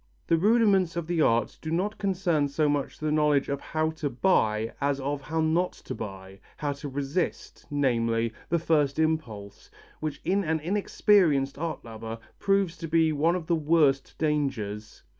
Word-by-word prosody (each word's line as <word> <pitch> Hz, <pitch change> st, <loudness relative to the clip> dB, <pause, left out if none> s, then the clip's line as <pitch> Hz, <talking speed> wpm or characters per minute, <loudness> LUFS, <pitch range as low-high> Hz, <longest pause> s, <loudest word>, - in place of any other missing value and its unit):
The 165 Hz, -, +3 dB
rudiments 200 Hz, -3 st, +3 dB
of 170 Hz, -1 st, -2 dB
the 170 Hz, -1 st, 0 dB
art 115 Hz, -5 st, +1 dB
do 160 Hz, -, -5 dB
not 185 Hz, +6 st, -1 dB
concern 180 Hz, -7 st, +1 dB
so 150 Hz, +2 st, 0 dB
much 145 Hz, -1 st, -1 dB
the 155 Hz, 0 st, -2 dB
knowledge 150 Hz, -2 st, +2 dB
of 140 Hz, 0 st, -2 dB
how 155 Hz, 0 st, -1 dB
to 155 Hz, -2 st, -3 dB
buy 115 Hz, -, +1 dB
as 140 Hz, 0 st, +1 dB
of 140 Hz, +1 st, -2 dB
how 160 Hz, +4 st, -2 dB
not 165 Hz, +3 st, +1 dB
to -, -, -8 dB
buy, 95 Hz, -2 st, -8 dB, 0.2 s
how 145 Hz, -2 st, -2 dB
to 140 Hz, +1 st, -7 dB
resist, 140 Hz, +5 st, -3 dB
namely, 115 Hz, -5 st, +1 dB, 0.2 s
the 170 Hz, -, +2 dB
first 150 Hz, -4 st, +1 dB
impulse, 130 Hz, -11 st, -2 dB, 0.3 s
which 155 Hz, -1 st, -4 dB
in 195 Hz, +2 st, +1 dB
an 160 Hz, -1 st, 0 dB
inexperienced 170 Hz, -5 st, +2 dB
art 165 Hz, -5 st, -4 dB
lover 115 Hz, 0 st, -7 dB, 0.2 s
proves 195 Hz, -4 st, +1 dB
to 165 Hz, +1 st, -6 dB
be 160 Hz, 0 st, +3 dB
one 160 Hz, +4 st, +2 dB
of 175 Hz, -3 st, -4 dB
the 170 Hz, -, 0 dB
worst 150 Hz, -4 st, +2 dB
dangers. 130 Hz, -9 st, -2 dB
150 Hz, 170 wpm, -27 LUFS, 135-170 Hz, 0.3 s, The